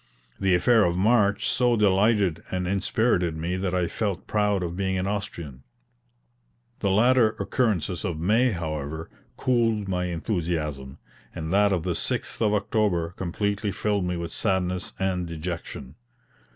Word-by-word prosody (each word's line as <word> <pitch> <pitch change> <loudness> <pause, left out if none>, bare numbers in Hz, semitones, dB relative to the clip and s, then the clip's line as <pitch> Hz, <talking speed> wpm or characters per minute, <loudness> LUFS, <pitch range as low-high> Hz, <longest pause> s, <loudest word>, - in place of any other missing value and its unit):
The 95 -2 +3
affair 110 +5 +4
of 85 -1 +1
March 105 0 +3
so 125 -2 +2
delighted 100 -3 +3
and 90 -1 -2
inspirited 95 -3 +1
me 85 +3 -2
that 95 -1 -1
I 90 -1 +1
felt 100 0 -3
proud 105 -3 +1
of 85 0 -4
being 95 0 -1
an 90 - -1
Austrian. 85 -9 -4 1.2
The 100 - 0
later 115 +2 +4
occurrences 100 -7 0
of 85 -3 -3
May, 110 +9 +3
however, 80 -3 -4 0.3
cooled 115 -5 +1
my 90 -1 -1
enthusiasm; 80 -7 -3 0.4
and 80 +2 -4
that 100 0 +4
of 90 -4 0
the - - -1
6th - - -3
of 105 -2 +3
October 100 -5 0
completely 100 +3 -2
filled 105 -1 0
me 90 0 -2
with 85 -1 -5
sadness 90 -3 -1
and 90 -2 -1
dejection. 80 -5 -6
95 Hz, 145 wpm, -25 LUFS, 85-105 Hz, 1.2 s, affair